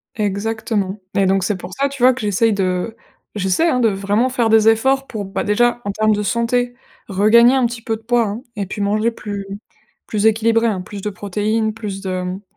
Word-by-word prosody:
Exactement 210 Hz, -1 st, -2 dB, 0.2 s
et 195 Hz, -, +3 dB
donc 190 Hz, 0 st, +2 dB
c'est 205 Hz, +2 st, 0 dB
pour 180 Hz, 0 st, -9 dB
ça, 275 Hz, +6 st, 0 dB
tu 275 Hz, -3 st, -5 dB
vois, 255 Hz, +1 st, +7 dB
que 260 Hz, -, -8 dB
j'essaye 210 Hz, +2 st, +2 dB
de 190 Hz, +2 st, -1 dB, 0.4 s
j'essaie, 195 Hz, -, +1 dB
hein, 255 Hz, -, +1 dB
de 230 Hz, -, +4 dB
vraiment 205 Hz, +4 st, +1 dB
faire 245 Hz, -3 st, 0 dB
des 220 Hz, 0 st, +5 dB
efforts 265 Hz, +5 st, +3 dB
pour, 215 Hz, -3 st, -5 dB
bah, 195 Hz, +1 st, -4 dB
déjà 240 Hz, +3 st, +2 dB
en 200 Hz, -, -1 dB
termes 215 Hz, +2 st, +1 dB
de 210 Hz, -, -1 dB
santé, 235 Hz, +3 st, 0 dB, 0.3 s
regagner 225 Hz, +5 st, +5 dB
un 260 Hz, -2 st, +3 dB
petit 235 Hz, 0 st, -4 dB
peu 225 Hz, -1 st, -2 dB
de 220 Hz, -, -12 dB
poids 240 Hz, +1 st, +1 dB
hein 205 Hz, +4 st, -5 dB, 0.2 s
et 200 Hz, -, -2 dB
puis 200 Hz, +2 st, -6 dB
manger 215 Hz, +3 st, +1 dB
plus 205 Hz, -3 st, -6 dB, 0.6 s
plus 210 Hz, -1 st, -1 dB
équilibré 225 Hz, +1 st, +3 dB
hein, 195 Hz, -5 st, -1 dB
plus 200 Hz, +2 st, -8 dB
de 210 Hz, -, -2 dB
protéines, 210 Hz, +2 st, -1 dB
plus 210 Hz, -3 st, -6 dB
de, 185 Hz, -2 st, -3 dB
mmh, 180 Hz, +2 st, -5 dB
215 Hz, 215 wpm, -19 LUFS, 200-230 Hz, 0.6 s, vois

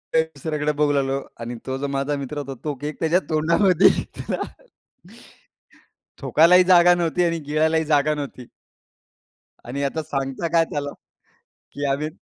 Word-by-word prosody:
एक 160 Hz, 0 st, +3 dB
दुसऱ्याकडे 150 Hz, +1 st, -2 dB
बघू 150 Hz, 0 st, +1 dB
लागलो 135 Hz, -1 st, 0 dB, 0.2 s
आणि 120 Hz, +1 st, -5 dB
तो 130 Hz, 0 st, -3 dB
जो 140 Hz, +1 st, -3 dB
माझा 140 Hz, +1 st, -1 dB
मित्र 140 Hz, +1 st, -6 dB
होता, 140 Hz, -2 st, -5 dB
तो 150 Hz, -, -2 dB
केक 150 Hz, +1 st, -5 dB
त्याच्या 165 Hz, +3 st, +2 dB
तोंडामध्ये 170 Hz, +4 st, +4 dB
होता. -, -, -5 dB, 1.8 s
थूकायलाही 180 Hz, +3 st, +5 dB
जागा 175 Hz, -1 st, +6 dB
नव्हती 175 Hz, 0 st, 0 dB
आणि 170 Hz, -1 st, 0 dB
गिळलाही 160 Hz, +2 st, 0 dB
जागा 150 Hz, 0 st, +2 dB
नव्हती. 140 Hz, -4 st, -7 dB, 1.2 s
आणि 140 Hz, +4 st, -3 dB
आता 155 Hz, +3 st, -2 dB
सांगता 135 Hz, +2 st, -3 dB
काय 165 Hz, -, +4 dB
त्याला, 145 Hz, -1 st, -3 dB, 0.8 s
की 145 Hz, -, -4 dB
आम्ही 150 Hz, +3 st, -2 dB
150 Hz, 140 wpm, -22 LUFS, 140-160 Hz, 1.8 s, जागा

